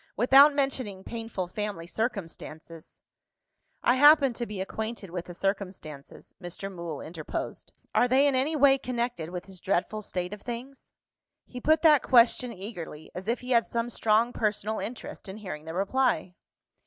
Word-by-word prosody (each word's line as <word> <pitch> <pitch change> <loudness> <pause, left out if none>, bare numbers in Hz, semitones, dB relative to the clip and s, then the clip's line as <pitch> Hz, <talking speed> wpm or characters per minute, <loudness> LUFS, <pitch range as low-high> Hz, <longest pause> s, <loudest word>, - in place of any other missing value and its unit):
Without 270 +6 +7
mentioning 255 -9 -2
painful 225 -5 -5
family 205 -2 -4
circumstances 165 -6 -6 0.4
" - - -45
"I 245 - +5
happen 290 -2 +7
to 235 0 -4
be 205 -2 -6
acquainted 220 0 -5
with 175 -1 -4
the 175 - -9
circumstances," 185 -7 -5
Mr. 190 +2 -6
Mool 170 -5 -6
interposed. 160 -1 -6 0.2
"Are 245 - +4
they 265 +3 +4
in 285 - +3
any 270 +5 +1
way 275 -2 +5
connected 240 -10 -3
with 180 0 -5
this 190 -2 -11
dreadful 195 +3 -1
state 180 -2 -4
of 210 - -9
things?" 250 +3 -8 0.5
He 250 - -9
put 315 +3 +3
that 300 -4 +7
question 245 0 +4
eagerly, 185 -7 -8
as 185 +2 -7
if 235 +2 0
he 250 +1 -6
had 235 -2 +4
some 235 +1 -2
strong 225 +2 +2
personal 215 0 -1
interest 230 -3 -7
in 190 - -7
hearing 185 -8 -7
the 160 +1 -6
reply. 200 0 +1
215 Hz, 165 wpm, -28 LUFS, 180-250 Hz, 0.5 s, Without